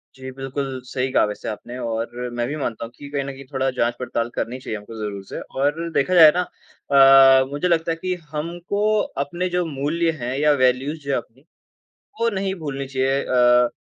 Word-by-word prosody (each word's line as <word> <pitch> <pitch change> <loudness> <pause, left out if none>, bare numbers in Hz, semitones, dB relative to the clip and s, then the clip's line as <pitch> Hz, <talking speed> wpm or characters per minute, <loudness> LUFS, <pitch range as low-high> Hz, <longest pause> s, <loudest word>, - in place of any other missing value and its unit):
जी, 130 0 -8
बिल्कुल 135 0 -4
सही 130 +1 -2
कहा - - +4
वैसे 105 0 -6
आपने 120 +3 -7
और 120 +1 -3
मैं 120 - 0
भी 145 - -3
मानता 115 -5 -3
हूँ 115 - -12
कि 145 - -10
कहीं 140 -1 -2
न - - -7
कहीं 135 0 -11
थोड़ा 135 0 +1
जाँच-पड़ताल 120 -1 -1
करनी 120 +2 -3
चाहिए 110 -4 -5
हमको 105 +2 -11
ज़रूर 100 -2 -5
से। - - -7 0.2
और 150 +5 0
देखा 160 +7 +1
जाए 160 -3 +9
ना 180 - +2 1.0
अ, - - 0
मुझे 145 +5 -1
लगता 165 -1 +1
है - - 0
कि 185 0 -1 0.2
हमको 175 +6 -3 0.4
अपने 175 +5 -3
जो 180 0 0
मूल्य 160 +3 -1
हैं 125 +2 -3
या 150 0 +4
वैल्यूज 130 +5 +1
जो 140 - -3
है - - +2
अपनी, 120 +2 -9 0.8
वो 230 - +3
नहीं 195 -1 -2
भूलनी 140 -2 -4
चाहिए। 135 +1 0
अ, 125 -1 +4
135 Hz, 200 wpm, -22 LUFS, 125-155 Hz, 1.0 s, जाए